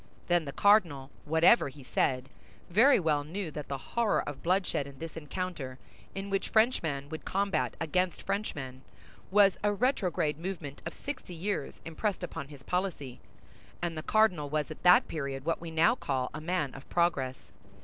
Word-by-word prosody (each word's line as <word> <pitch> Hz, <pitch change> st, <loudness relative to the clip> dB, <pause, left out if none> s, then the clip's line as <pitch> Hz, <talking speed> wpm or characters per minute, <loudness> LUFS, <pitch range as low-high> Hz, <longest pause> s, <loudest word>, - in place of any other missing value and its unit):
Then 175 Hz, -2 st, +2 dB
the 140 Hz, -, -4 dB
cardinal, 165 Hz, -9 st, +3 dB
whatever 160 Hz, +4 st, +5 dB
he 135 Hz, 0 st, -13 dB
said, 130 Hz, +1 st, 0 dB, 0.4 s
very 235 Hz, +9 st, +6 dB
well 150 Hz, -4 st, +1 dB
knew 170 Hz, +3 st, -5 dB
that 150 Hz, -1 st, -6 dB
the 140 Hz, -, -3 dB
horror 230 Hz, -, 0 dB
of 145 Hz, -2 st, -6 dB
bloodshed 180 Hz, -5 st, +1 dB
in 140 Hz, -1 st, -12 dB
this 165 Hz, +1 st, -7 dB
encounter, 160 Hz, -4 st, -5 dB, 0.4 s
in 195 Hz, +1 st, -5 dB
which 195 Hz, -, -1 dB
Frenchman 165 Hz, -, +2 dB
would 160 Hz, 0 st, -6 dB
combat 195 Hz, -4 st, 0 dB
against 180 Hz, +3 st, 0 dB
Frenchman, 135 Hz, -11 st, -3 dB, 0.5 s
was 200 Hz, -1 st, +5 dB
a 205 Hz, -, +3 dB
retrograde 190 Hz, -, 0 dB
movement 170 Hz, -6 st, -5 dB
of -, -, -6 dB
sixty 280 Hz, -11 st, -6 dB
years 180 Hz, -3 st, -3 dB
impressed 185 Hz, +4 st, -2 dB
upon 140 Hz, -5 st, -5 dB
his 140 Hz, -3 st, -13 dB
policy; 180 Hz, -9 st, -3 dB, 0.6 s
and 170 Hz, -1 st, -2 dB
the 155 Hz, -, -3 dB
cardinal 180 Hz, -7 st, +2 dB
was 155 Hz, +1 st, -1 dB
at 155 Hz, -, -9 dB
that 180 Hz, 0 st, +6 dB
period 140 Hz, -3 st, -4 dB
what 165 Hz, 0 st, 0 dB
we 170 Hz, -, -6 dB
now 165 Hz, +8 st, +4 dB
call 130 Hz, -, -2 dB
a 155 Hz, -, -6 dB
man 155 Hz, -5 st, -1 dB
of 135 Hz, -, -12 dB
progress. 140 Hz, -7 st, 0 dB
165 Hz, 170 wpm, -30 LUFS, 140-195 Hz, 0.6 s, very